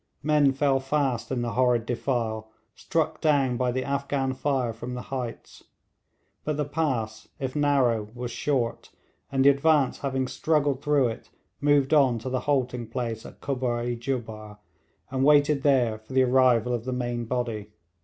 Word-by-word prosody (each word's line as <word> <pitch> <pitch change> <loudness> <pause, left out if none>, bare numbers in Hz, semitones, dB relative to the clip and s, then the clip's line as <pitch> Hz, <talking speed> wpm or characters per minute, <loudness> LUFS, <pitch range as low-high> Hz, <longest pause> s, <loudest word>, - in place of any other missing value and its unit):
Men 150 -2 +4
fell 135 0 +2
fast 135 -3 -1
in 125 -2 -1
the 120 - -2
horrid 120 -1 +2
defile, 115 -3 -2 0.2
struck 160 -1 -2
down 140 -5 +2
by 125 0 0
the 130 +1 -2
Afghan 140 -1 -1
fire 130 -3 -1
from 120 +3 -6
the 125 - -6
heights; 125 -3 -6 0.8
but 150 -1 -2
the 150 - 0
pass, 130 -8 -2
if 130 0 -4
narrow, 130 -7 +2
was 125 0 -5
short, 125 -3 -2 0.4
and 135 0 +2
the - - +9
advance 140 -1 +3
having 135 -2 -1
struggled 145 -1 0
through 145 -4 +2
it 115 - -8 0.3
moved 145 -1 +3
on 135 -5 +4
to 115 +3 -5
the 130 - 0
halting 125 -4 0
place 115 -1 -4
at - - -15
Kubbar 125 -3 -1
i 120 0 -2
Jubbar, 115 -4 -5 0.5
and 130 0 0
waited 145 0 +4
there 125 -6 +2
for 110 +4 -13
the 130 0 +4
arrival 125 -2 +3
of 120 -1 -3
the 130 - -2
main 120 -1 -2
body. 115 -4 -3
130 Hz, 165 wpm, -26 LUFS, 120-140 Hz, 0.8 s, the